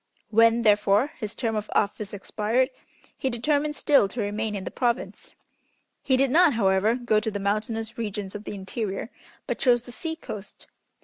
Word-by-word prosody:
When, 230 +1 +5
therefore, 210 +5 +3
his 215 0 -4
term 225 -3 -1
of 215 0 -3
office 205 0 0
expired, 215 +5 0 0.4
he 265 - -2
determined 290 +5 0
still 280 -10 +4
to 235 - -8
remain 210 +1 -2
in 195 - -4
the - - -5
province. 240 -1 -2 0.7
He 260 - +2
did 270 -1 +3
not, 335 0 +5
however, 200 +1 +3
go 240 -4 +1
to 215 - -2
the 205 - -4
mountainous 220 +3 -2
regions 205 -3 -4
of 210 +1 -7
the - - -5
interior, 195 +3 -4 0.3
but - - -3
chose 240 -2 +3
the 245 - -11
sea 320 +5 -4
coast. 210 -10 -9
220 Hz, 175 wpm, -25 LUFS, 205-245 Hz, 0.7 s, When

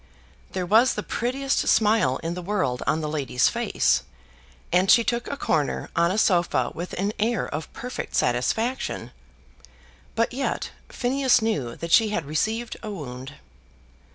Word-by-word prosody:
There 185 -1 -2
was 225 +7 +4
the - - -3
prettiest 265 +3 -1
smile 215 - +3
in 165 +1 -2
the 180 - -5
world 175 -10 -1
on 160 - +1
the 155 - -2
lady's 140 -5 +1
face, - - +1 0.7
and 180 +2 +3
she 235 - +7
took 235 +1 -1
a 280 - -4
corner 150 - -1
on 170 0 +3
a 190 - -1
sofa 170 - +2
with 175 +2 -6
an 200 +3 -1
air 225 0 +1
of 155 +2 -5
perfect 250 +1 -6
satisfaction. 220 - 0 1.0
But 230 +2 +1
yet 270 +2 -2 0.2
Phineas 260 -1 +2
knew 140 - -1
that 170 0 -6
she 220 +3 +6
had 175 -7 -2
received 220 +11 -2
a 215 - -6
wound. 135 -7 -7
190 Hz, 155 wpm, -25 LUFS, 150-230 Hz, 1.0 s, she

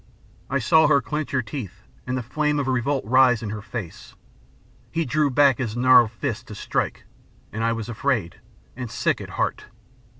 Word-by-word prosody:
"I 140 - +1
saw 160 +5 +4
her 145 -1 +5
clench 150 +2 -4
her 130 -3 0
teeth, 110 -3 -7 0.2
and 130 0 -1
the 125 - -3
flame 150 +4 0
of 140 -2 -1
revolt 130 0 0
rise 125 0 +4
in 105 - -4
her 105 0 -5
face. 100 -5 -8 0.7
He 165 -1 -1
drew 145 +2 +1
back 140 -1 +4
his 120 -3 -3
gnarled 125 -2 +6
fist 110 -3 -4
to - - -8
strike, - - -2 0.5
and 110 +1 -3
I 115 0 +2
was 115 -1 -5
afraid, 115 -7 -2 0.4
and 125 -2 -6
sick - - 0
at - - -8
heart. - - -1
125 Hz, 180 wpm, -23 LUFS, 115-140 Hz, 0.7 s, gnarled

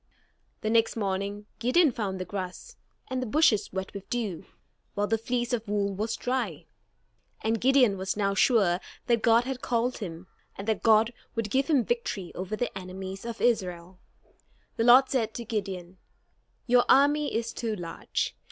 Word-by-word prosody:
The 215 - -1
next 230 0 +3
morning, 200 0 -2
Gideon 260 +7 +4
found 200 -5 -3
the 185 - -3
grass, 185 - -6 0.3
and 260 -1 -2
the 255 - -3
bushes 220 -6 +3
wet 190 0 -4
with 200 -1 -9
dew, 220 -8 -3 0.5
while 205 - +1
the 225 - +1
fleece 240 +1 -2
of 230 -2 -2
wool 200 -1 0
was 215 +3 -2
dry. 255 +1 -2 0.8
And 225 0 0
Gideon 250 -6 +4
was 190 +2 -2
now 200 -1 +1
sure 195 -4 +3 0.3
that 235 -2 +2
God 230 +1 +5
had 260 0 -4
called 240 +1 0
him, 175 -4 -7 0.3
and 195 - -7
that 220 - 0
God 225 +1 +4 0.2
would 225 -3 -2
give 270 +1 +2
him 275 -8 +3
victory 220 -6 -2
over 185 +3 -4
the 245 +3 -3
enemies 190 +2 -7
of 235 -1 -6
Israel. 185 -6 0 0.8
The 230 - 0
Lord 255 +2 +8
said 225 -5 -1
to 235 - -5
Gideon: 190 -4 -4 0.7
"Your 245 -1 +5
army 290 +2 +4
is 230 0 -2
too 225 -2 -2
large. 170 -4 -3
220 Hz, 170 wpm, -28 LUFS, 195-245 Hz, 0.8 s, Lord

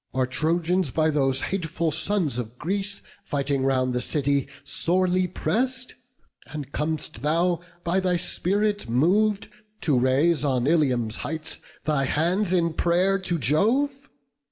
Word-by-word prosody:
Are 130 -1 +2
Trojans 165 +5 0
by 155 +4 +1
those 135 -3 +1
hateful 165 -3 -1
sons 160 - 0
of 120 0 -6
Greece, 200 +5 -2 0.2
Fighting 140 -1 -1
around 130 -1 +1
the 125 0 -1
city, 140 +1 0 0.2
sorely 185 +1 +1
press'd? 250 +7 -2 0.5
And 145 -3 -7
com'st 150 -6 -3
thou, 170 +4 +1 0.2
by 175 +3 +1
thy 185 -1 +1
spirit 205 - 0
mov'd, 195 - +2 0.3
to 140 -6 +2
raise, 145 +6 +2
On 130 -4 +1
Ilium's 130 -8 +1
heights, 160 +1 -5 0.3
thy 150 -3 +1
hands 175 +7 +1
in 170 -3 +2
pray'r 180 +4 +2
to 180 -2 -2
Jove? 245 - +1
160 Hz, 130 wpm, -25 LUFS, 140-185 Hz, 0.5 s, Are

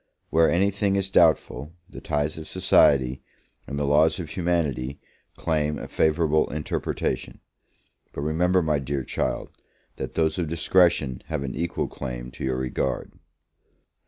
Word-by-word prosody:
Where 80 0 +4
any 95 +4 +2
thing 100 0 0
is 95 -1 -1
doubtful, 80 -2 +3
the - - -11
ties 75 +1 -1
of 80 - -9
society, 65 -2 +3 0.5
and 70 - -4
the 75 - -1
laws 80 +4 +3
of 80 -4 -6
humanity, 75 -7 -1 0.4
claim 75 -2 0
a - - -7
favourable 80 -1 +2
interpretation; 75 0 -3 0.7
but - - -6
remember, 90 +4 +2
my 75 -2 +1
dear 70 0 -3
child, - - -2 0.5
that - - -5
those 80 +1 +1
of 85 - -1
discretion 80 -5 +2
have 75 -3 -2
an 65 -2 -4
equal 85 +1 -2
claim - - -6
to 65 - -9
your 65 -1 0
regard. 65 0 -2
75 Hz, 145 wpm, -25 LUFS, 70-85 Hz, 0.7 s, Where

